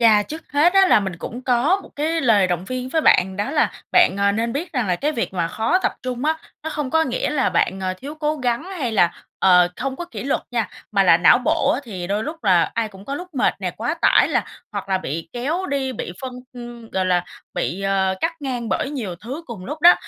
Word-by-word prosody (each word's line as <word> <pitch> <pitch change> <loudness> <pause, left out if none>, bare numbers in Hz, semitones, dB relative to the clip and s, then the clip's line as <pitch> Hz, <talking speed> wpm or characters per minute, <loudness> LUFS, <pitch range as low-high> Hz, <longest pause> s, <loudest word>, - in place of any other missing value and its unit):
Yeah. 215 -3 +5
Trước 320 +1 -6
hết 300 +5 +4
á 390 0 +7
là 230 - +6
mình 190 -3 -4
cũng 245 +8 -7
có 260 +10 +2
một - - -13
cái 320 +3 0
lời 215 -6 +4
động 180 0 -2
viên 255 +3 -4
với 320 +4 +1
bạn. 190 -9 +4
Đó 205 +5 -2
là 300 0 +2 0.2
bạn, 355 - +5
ờ, 200 0 +3
nên 230 +3 -1
biết 320 +7 -4
rằng 250 -6 0
là 180 -2 +1
cái 295 +10 -1
việc 230 -8 -2
mà 170 -2 0
khó 225 - +1
tập - - 0
trung 255 +1 -3
á, 315 +1 +2 0.3
nó 320 - -4
không 295 -4 -3
có 320 +3 +3
nghĩa 255 0 -1
là 295 -3 +1
bạn, 190 +2 +1
ờ, 185 -1 -2
thiếu 275 +10 -8
cố 310 0 -1
gắng 250 +1 -1
hay 335 -12 -3
là, 175 -5 +3 0.3
ờ, 180 -2 +5
không 265 0 -3
có 350 - -5
kỷ 345 - -7
luật 275 - 0
nha, 230 -5 -1 0.2
mà 200 - +4
là 175 -3 +6
não 175 +8 +6
bộ 275 +3 +2
á, - - -2
thì 185 -7 -6
đôi 205 +3 -1
lúc 310 -3 -7
là 180 -4 +4
ai 230 -1 0
cũng 195 -1 -14
có 275 - -4
lúc 360 +5 -6
mệt 255 - +2
nè, - - -1
quá - - -1
tải - - +4
là - - +1 0.3
hoặc 200 -1 -5
là 190 -1 +1
bị 165 -2 -5
kéo 305 +10 -2
đi, 270 -3 -1
bị 190 - -5
phân 260 -1 -5 0.2
ưm, 240 -2 -10
gọi 185 -1 0
là 180 -1 +2 0.3
bị, 185 - -2
ờ, 195 -1 +1
cắt 335 - +1
ngang 250 -5 -3
bởi 220 +7 -1
nhiều 230 -11 -4
thứ 260 - -7
cùng 210 -6 -8
lúc 300 +7 -6
đó. 345 +3 +9
240 Hz, 255 wpm, -21 LUFS, 195-290 Hz, 0.3 s, đó